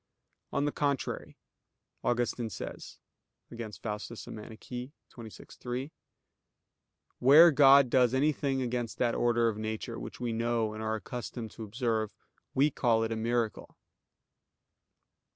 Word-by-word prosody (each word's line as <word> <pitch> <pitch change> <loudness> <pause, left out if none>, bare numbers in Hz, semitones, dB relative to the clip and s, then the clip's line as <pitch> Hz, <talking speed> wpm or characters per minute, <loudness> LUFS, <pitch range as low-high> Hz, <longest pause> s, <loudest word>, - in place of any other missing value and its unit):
On 140 - 0
the 145 - 0
contrary, 140 -3 -2 0.7
Augustine 120 -1 0
says - - -8 0.5
(Contra 115 -2 -6
Faust. 105 +3 -5
xxvi, 115 +2 -8 0.7
3): 125 +4 -4 1.3
"Where 155 +7 +8
God 140 -1 +7
does 125 -1 +4
anything 135 -1 +1
against 120 -1 -3
that 120 -2 +1
order 120 -1 +2
of 110 -2 -2
nature 110 0 -4
which - - -8
we 120 -2 -2
know 115 -1 0
and 110 - -6
are 110 0 -1
accustomed 115 0 -6
to 115 - -8
observe, 110 -1 -2 0.4
we 145 +3 +4
call 115 -4 +2
it 115 - -2
a - - 0
miracle." 115 0 -2
120 Hz, 120 wpm, -30 LUFS, 110-130 Hz, 1.3 s, Where